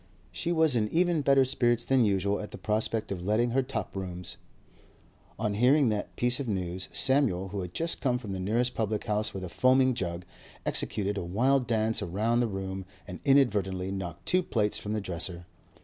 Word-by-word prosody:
She 90 - -2
was 160 -5 +3
in 105 -2 +1
even 170 -1 +2
better 135 -1 +4
spirits 120 -2 +1
than 135 -2 +3
usual 100 0 +1
at 105 - -6
the - - -9
prospect 110 0 -1
of 90 -3 -4
letting 110 +5 +1
her 135 +3 +2
top 130 -4 -5
rooms. 90 -2 -5 1.0
On 105 -1 -1
hearing 125 +5 +4
that 105 -1 -3
piece 125 +2 +1
of 140 - -3
news, 95 -3 -3
Samuel, 125 -9 +2
who 100 +1 -4
had 90 -1 -7
just 165 +1 +1
come 125 -3 +1
from 110 -5 -7
the 95 - -3
nearest 120 +6 0
public 110 -2 -1
house 105 0 0
with 95 - -6
a - - -4
foaming 130 +7 +3
jug, 90 -5 -4 0.4
executed 100 0 -1
a - - -4
wild 125 +9 +1
dance 110 -1 +1
round 110 +7 0
the 120 - +1
room 95 -2 -4 0.2
and 90 - -7
inadvertently 100 -9 +2
knocked 90 -3 -6
two 185 - +3
plates 105 - 0
from 105 - -4
the 110 - -1
dresser. 85 -1 -3
105 Hz, 195 wpm, -28 LUFS, 95-125 Hz, 1.0 s, better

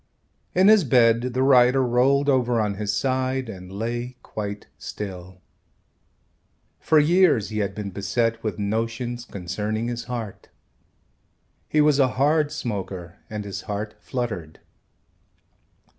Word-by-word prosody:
In 185 +2 +5
his 215 -2 +7
bed 115 -3 +4
the 130 - +2
writer 130 0 +5
rolled 130 +3 +3
over 125 -4 +2
on 105 -2 0
his 105 +1 -2
side 130 +3 -1
and 90 -3 -9
lay 120 +4 -4
quite 105 -1 -5
still. 90 -3 -7 1.4
For 160 - +3
years 155 - +4
he 110 -1 -3
had 100 -2 -2
been 105 -2 -5
beset 115 +4 -1
with 105 -5 -2
notions 115 +3 -2
concerning 105 +4 -3
his 120 0 -4
heart. 115 -5 -6 1.2
He 155 - +3
was 150 -1 +4
a 135 - +5
hard 150 +2 +3
smoker 95 -6 -5
and 105 -1 -5
his 100 - -5
heart 105 +1 -3
fluttered. 105 - -5
115 Hz, 130 wpm, -24 LUFS, 105-130 Hz, 1.4 s, his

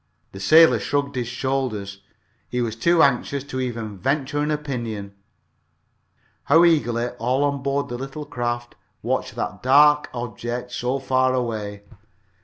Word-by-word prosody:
The 95 - -10
sailor 160 +11 +6
shrugged 140 0 -1
his 125 -2 -2
shoulders. 120 -6 -3 0.5
He 125 - -2
was 115 -2 -1
too 170 +8 +3
anxious 140 0 +1
to 130 -2 -5
even 115 -5 -4
venture 140 +3 -1
an 150 +1 0
opinion. 120 -9 -4 1.3
How 165 +2 +6
eagerly 120 -7 +2
all 130 +4 +1
on 140 -1 0
board 140 +1 -1
the 120 0 -5
little 135 +3 -6
craft 120 -3 -3 0.3
watched - - -2
that - - -4
dark 150 +3 +5
object 120 0 -5
so 125 +2 -1
far 130 -1 +1
away! 105 -5 -3
130 Hz, 140 wpm, -23 LUFS, 120-140 Hz, 1.3 s, sailor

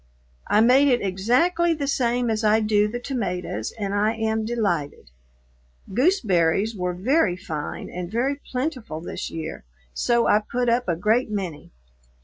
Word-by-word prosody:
I 210 - +4
made 260 +5 +5
it 245 -5 +2
exactly 325 - +2
the 290 -2 -3
same 245 -3 +1
as 220 0 -1
I 215 +1 +4
do 210 -1 +2
the 230 +3 -4
tomatoes 180 - -3
and 200 -2 -3
I 210 +2 +1
am 220 0 -1
delighted. 175 - -2 0.8
Gooseberries 215 - +2
were 180 -2 -2
very 205 - +2
fine 155 -6 -5
and 180 -1 -6
very 270 +5 -1
plentiful 255 - -3
this 170 - -5
year, 160 0 -6 0.3
so 235 - +2
I 210 - +4
put 240 +3 -2
up 240 +1 +1
a 170 - +2
great 220 +8 +1
many. 185 -8 -5
220 Hz, 150 wpm, -24 LUFS, 185-245 Hz, 0.8 s, made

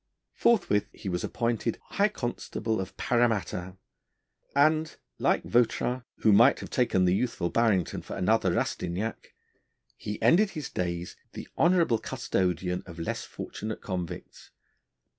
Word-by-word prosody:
Forthwith 175 - +2
he - - -9
was 90 -1 -2
appointed 115 -1 -1
high 200 - +3
constable 120 - -3
of 95 - -8
Paramatta, 105 -7 0 0.8
and, 155 +2 +3 0.2
like - - +2
Vautrin, 120 +1 +1 0.2
who 110 - +5
might 120 +7 +6
have - - -8
taken 115 -8 +2
the 90 - +3
youthful 95 -5 -1
Barrington 105 -7 +1
for - - -7
another - - +2
Rastignac, 95 +6 -3 0.6
he 105 0 -5
ended 195 +5 +4
his 155 -7 -6
days 85 -1 -3 0.2
the - - -7
honourable 170 -9 +3
custodian 90 0 -1
of 85 -1 -10
less 85 - -3
fortunate 110 +1 -6
convicts. 90 -4 -6
110 Hz, 125 wpm, -28 LUFS, 90-125 Hz, 0.8 s, might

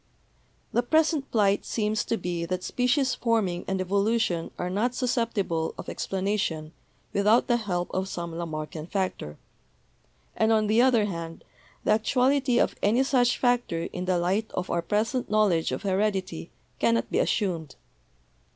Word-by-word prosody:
The 240 - +3
present 310 +2 +1
plight 205 -3 +2
seems 215 -1 -1
to 230 - 0
be 175 -2 -3
that 185 +1 -3
species 250 +1 +1
forming 220 -8 0
and 190 0 -1
evolution 200 -2 0
are 180 - -2
not 215 +7 0
susceptible 230 -10 -1
of - - -7
explanation 190 -5 -2 0.4
without 210 +4 +4
the 240 - +2
help 180 -6 -3
of 190 +1 -1
some 170 -3 -5
Lamarckian 155 -1 -5
factor; 185 - -3 1.0
and, 220 0 +2
on 215 -1 +3
the 220 +3 +3
other 245 -4 +4
hand, 165 -4 -6 0.4
the - - +2
actuality 255 +4 +2
of - - +2
any 230 +6 +3
such 250 -3 +2
factor 245 -9 +1
in 180 - -4
the 185 -1 +1
light 190 +6 0
of 180 - -3
our 170 - +1
present 220 +7 -1
knowledge 205 -7 +2
of - - -4
heredity 190 -3 -1 0.3
cannot 230 0 +1
be - - +1
assumed. 170 - -1
205 Hz, 150 wpm, -26 LUFS, 175-235 Hz, 1.0 s, without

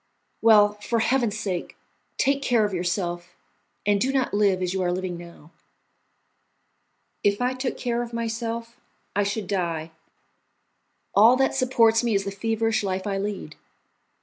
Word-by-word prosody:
Well, 210 -2 +5
for 230 +2 -1
Heaven's 235 -2 +1
sake, 190 -5 -4 0.4
take 275 +1 +2
care 235 -5 +2
of 205 - -3
yourself, 175 -1 -3 0.5
and 205 -1 +2
do 265 - +2
not 265 -2 0
live 200 -3 +2
as 180 0 -1
you 190 - -1
are 175 -1 +1
living 180 0 -3
now." 170 -2 -12 1.7
"If 200 0 +2
I 250 +1 +1
took 255 0 -3
care 240 -1 -1
of 240 -1 -5
myself 230 0 -4 0.4
I 205 - +3
should 205 +1 -2
die. 170 -4 -2 1.2
All 225 +5 +7
that 265 0 +2
supports 240 -3 +3
me 235 -3 +1
is 195 0 0
the 200 - -3
feverish 225 +2 0
life 190 -1 -2
I 195 -1 -1
lead. 200 -6 -5
210 Hz, 150 wpm, -25 LUFS, 190-235 Hz, 1.7 s, All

